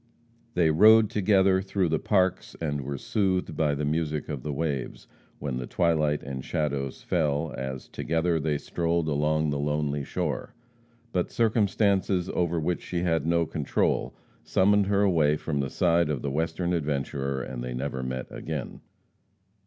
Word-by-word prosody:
They 85 -3 +4
rode 110 +6 +6
together 95 -2 +3
through 95 -2 0
the 80 0 +1
parks, 95 -3 +1
and 75 -3 -2
were 70 +1 -4
soothed 95 +3 0
by 75 -2 +1
the 75 +1 -2
music 75 0 -1
of 70 -4 -4
the 75 - -4
waves, 70 -3 -3 0.3
when 70 -3 -3
the 65 -1 -4
twilight 75 -4 +1
and 65 -1 -5
shadows 70 -3 -2
fell, 75 -2 0
as 65 -1 -5
together 80 +1 0
they 75 -1 0
strolled 85 +1 -1
along 75 +1 +1
the 70 - -1
lonely 75 0 -1
shore. - - -3 0.6
But 90 -4 0
circumstances 100 -4 +1
over 85 -1 0
which 85 +2 -1
she 90 -1 -3
had 80 -3 +1
no 85 0 +2
control 75 -2 -1 0.3
summoned 100 +1 +3
her 100 0 +2
away 80 -6 +3
from 75 -1 -3
the 70 -1 -1
side 85 0 +2
of 70 -5 -2
the 70 - -1
Western 80 +4 -1
adventurer, 70 -4 -2
and - - -6
they 60 0 -4
never 65 0 -3
met 65 0 -3
again. 75 -4 -5
80 Hz, 160 wpm, -27 LUFS, 70-90 Hz, 0.6 s, rode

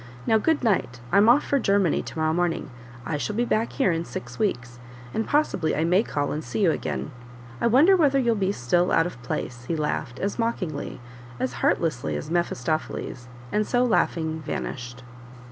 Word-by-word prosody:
Now, 220 - +4
good 320 +4 +1
night 185 - +1
I'm 200 +4 +6
off 260 +5 +6
for 280 - +1
Germany 200 - +2
to - - -9
morrow 160 0 +1
morning; 175 -4 -1 0.3
I 150 +2 -1
shall 210 +8 -3
be 240 +2 +1
back 225 0 0
here 205 -10 +2
in 165 0 -1
six 120 -6 -8
weeks, 120 - -2 0.3
and 220 - -1
possibly 240 - +1
I 155 - +1
may 180 +4 +4
call 145 -9 -2
and 155 - -3
see 120 -2 -3
you - - +5
again; 65 +2 -3 0.5
I - - +3
wonder 290 - +6
whether 290 -6 +3
you'll 240 -3 +3
be 195 -3 0
still 175 +3 +1
out 165 - +4
of 175 -9 -6
place!" 125 0 -4
he 165 - -1
laughed, 145 -4 -2
as 200 - -3
mockingly, 190 -10 -2 0.4
as 130 0 -1
heartlessly 155 -8 +1
as 155 - -5
Mephistopheles, 155 -5 -2 0.2
and 210 0 +1
so 245 0 +2
laughing, 160 -8 0
vanished. 125 -3 -5
170 Hz, 185 wpm, -25 LUFS, 135-220 Hz, 0.5 s, I'm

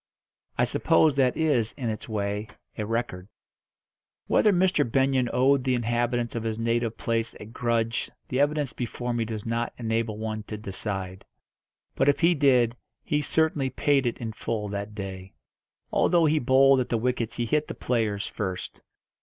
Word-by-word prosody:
I - - +3
suppose 155 -3 +3
that 130 -2 +3
is, 140 -9 +1
in 125 -5 -3
its 110 - -7
way, 105 0 -2 0.3
a 105 - -3
record. 115 -5 -3 1.0
Whether 210 - +4
Mr. 185 -4 +3
Benyon 135 -2 +2
owed 130 +1 +3
the 130 0 +1
inhabitants 120 0 0
of 115 - -2
his 110 -1 -3
native 115 0 0
place 115 -1 -1
a - - -8
grudge 115 0 -1 0.2
the 130 - -1
evidence 145 -1 +1
before 120 0 -3
me 115 -1 0
does 110 -2 -5
not 115 +1 -2
enable 115 -2 -1
one 110 0 -3
to 105 - -5
decide; 95 -2 -5 0.7
but, 135 - +2
if 140 - +1
he 170 +1 +5
did, 125 -6 +3 0.3
he 150 0 0
certainly 150 -3 +1
paid 135 0 +2
it 120 - -2
in 115 -3 -5
full 110 -1 -3
that 100 +1 -5
day. 95 -2 -7 0.6
Although 170 -2 +3
he 155 0 +3
bowled 135 +1 +5
at 125 - -2
the 115 - +1
wickets 120 -1 -1
he 120 - -1
hit 150 +5 0
the - - -6
players 110 -4 -1
first. 95 -3 -5
120 Hz, 170 wpm, -26 LUFS, 110-135 Hz, 1.0 s, he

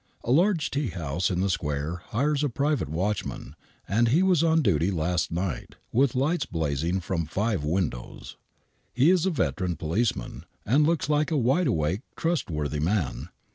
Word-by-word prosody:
A 120 - -1
large 170 +2 +3
tea 140 -1 -1
house 85 -1 -2
in 90 -1 0
the 100 - +1
square 75 +2 -2
hires 145 +5 0
a 145 - +1
private 140 - 0
watchman, 95 +6 -3 0.3
and. 115 +4 +2
he 155 +10 +3
was 185 -5 +3
on 160 -1 +3
duty 85 - +2
last 85 -2 -1
night, 85 -6 -3 0.2
with 130 +1 +2
lights 150 +7 +1
blazing 80 +3 -1
from 85 -3 -2
five 100 0 -1
windows. 75 -6 -3 0.6
He 135 +8 +4
is 185 -1 +2
a - - +3
veteran 90 - -1
policeman, 90 +9 -2 0.2
and 145 +7 +3
looks 165 -4 +1
like 150 +1 +1
a 160 - +1
wide 135 +8 +2
awake,, 80 +6 0
trustworthy 75 - -1
man. 85 -1 -1
100 Hz, 165 wpm, -26 LUFS, -, 0.6 s, He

